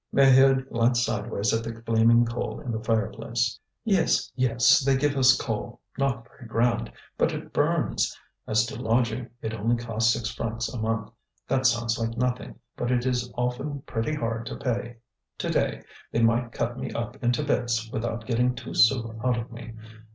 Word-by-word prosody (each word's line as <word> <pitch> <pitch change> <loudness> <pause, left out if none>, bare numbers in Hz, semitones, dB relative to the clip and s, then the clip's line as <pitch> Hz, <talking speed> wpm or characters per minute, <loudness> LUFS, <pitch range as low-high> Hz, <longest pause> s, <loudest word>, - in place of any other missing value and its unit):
Maheude 135 0 +5
glanced 120 0 +2
sideways 105 +2 -1
at 115 0 0
the 115 0 -6
flaming 115 +1 +4
coal 115 +1 -4
in 125 - -5
the 110 -1 -4
fireplace. 115 +1 -1 0.2
"Yes, 200 -5 +2
yes, 125 +4 +4
they 135 -2 +2
give 145 +1 +1
us 130 -1 +5
coal, 120 +1 -4 0.2
not 120 -5 -1
very 120 - -14
grand, 115 0 +1 0.3
but - - +3
it - - -7
burns. - - +1 0.3
As 110 0 +3
to 115 - -7
lodging, 115 +1 0
it 110 - -3
only 115 +2 +1
costs 115 -1 +1
six 115 -1 -2
francs 115 +1 -3
a 125 - -4
month; 110 -1 -2 0.4
that 130 0 +3
sounds 115 -2 +1
like 115 0 -2
nothing, 125 +1 -1 0.2
but 120 - -2
it 125 0 +1
is 125 -1 -1
often 130 +3 -2
pretty 115 +6 -2
hard 115 -3 -3
to - - -5
pay. 120 -1 -3 0.4
To - - -3
day - - 0 0.3
they 115 - +1
might 115 +1 +2
cut 120 +2 -3
me - - -4
up 120 +4 -5
into 120 +4 +1
bits 120 -5 0
without 115 0 -3
getting 125 +1 +1
two 115 -1 -7
sous 115 +1 +4 0.2
out 125 -2 +2
of 115 +1 -5
me. 115 -1 -9
120 Hz, 180 wpm, -26 LUFS, 115-125 Hz, 0.4 s, Maheude